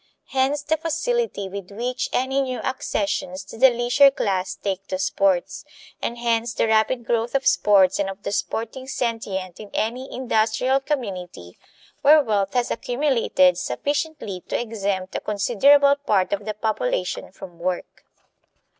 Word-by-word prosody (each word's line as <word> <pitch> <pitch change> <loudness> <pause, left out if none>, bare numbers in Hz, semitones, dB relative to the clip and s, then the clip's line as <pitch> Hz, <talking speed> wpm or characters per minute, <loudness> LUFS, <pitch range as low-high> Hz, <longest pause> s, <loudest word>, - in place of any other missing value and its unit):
Hence 270 +2 +1
the 315 +2 +1
facility 330 - -1
with 195 -1 -7
which 245 +5 -3
any 265 +2 +1
new 255 -2 -2
accessions 200 -7 -2
to 195 - -12
the 260 +4 +6
leisure 245 +4 +5
class 190 -8 -2
take 195 -1 -4
to 185 - -2
sports; 190 -1 0 0.4
and 235 - -3
hence 235 -1 0
the - - +2
rapid 220 +2 +2
growth 235 +2 -1
of 270 - +1
sports 195 -3 +4
and 195 -1 0
of 195 +1 -9
the - - -3
sporting 230 +5 -3
sentient 205 -8 -3
in 210 - -9
any 250 +5 -2
industrial 250 +2 +1
community 185 - -5 0.4
where 300 +1 +7
wealth 205 -4 -1
has 245 -1 +1
accumulated 235 -9 +2
sufficiently 285 - -3
to - - -1
exempt 200 -5 -3
a - - -1
considerable 275 +7 +4
part 205 -10 0
of 200 0 -3
the 215 -1 -3
population - - -2
from 175 -2 -12
work. 180 +1 -4
225 Hz, 145 wpm, -23 LUFS, 195-265 Hz, 0.4 s, where